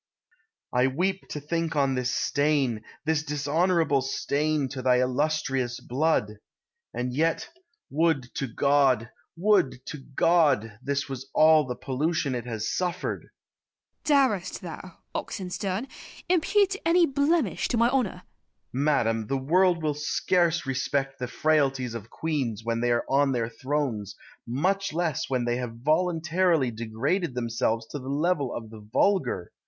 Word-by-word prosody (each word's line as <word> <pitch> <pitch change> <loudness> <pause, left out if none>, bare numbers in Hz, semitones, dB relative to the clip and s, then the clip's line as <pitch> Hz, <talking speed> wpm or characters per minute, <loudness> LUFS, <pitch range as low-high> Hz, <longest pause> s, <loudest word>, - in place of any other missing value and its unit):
I 125 +1 +4
weep 185 +8 -1
to 150 - -4
think 165 +2 -2
on 140 -2 +2
this 125 -1 -1
stain, 140 -6 +1 0.2
this 160 -1 +2
dishonourable 150 +1 +1
stain, 145 +2 0
to 130 -1 -5
thy 125 0 +4
illustrious 130 -2 0
blood! 125 -6 0 0.5
And 125 0 -3
yet, 160 +4 0 0.4
would 145 -4 +1
to 135 - -2
God! 130 -2 +2 0.3
would 150 -10 +2
to 150 - -6 0.2
God! 145 -11 +3
this 140 +1 -1
was 135 0 -7
all 155 -2 +6
the 125 - -3
pollution 135 +3 -1
it 125 -1 -4
has 110 -2 -3
suffered! 180 0 -2
Christina. - - -42
Darest 210 -11 +1
thou, 175 +1 -8 0.2
Oxenstiern, 190 +4 -3 0.4
impute 385 +3 +3
any 340 +1 +5
blemish 285 - +1
to 240 - -1
my 235 +2 +4
honour? 220 -9 -1
Oxenstiern. - - -45
Madam, 125 -6 +1
the 135 - 0
world 170 +5 +2
will 150 -1 +1
scarce 170 +3 +1
respect 135 +1 -1
the 125 - -3
frailties 135 -4 +1
of 115 -1 -7
queens 135 -9 -2
when 115 0 -1
they 120 - +1
are 120 0 +1
on 140 0 +2
their 115 -2 -1
thrones, 120 -5 -3 0.3
much 185 +11 0
less 165 -4 -1
when 125 -2 0
they 120 0 0
have 115 -2 -6
voluntarily 165 -2 +2
degraded 125 - -2
themselves 115 -1 -1
to 145 - -5
the 130 0 -7
level 145 -1 0
of 110 -2 -7
the 110 - -10
vulgar. 185 - +1
145 Hz, 145 wpm, -26 LUFS, 125-170 Hz, 0.5 s, all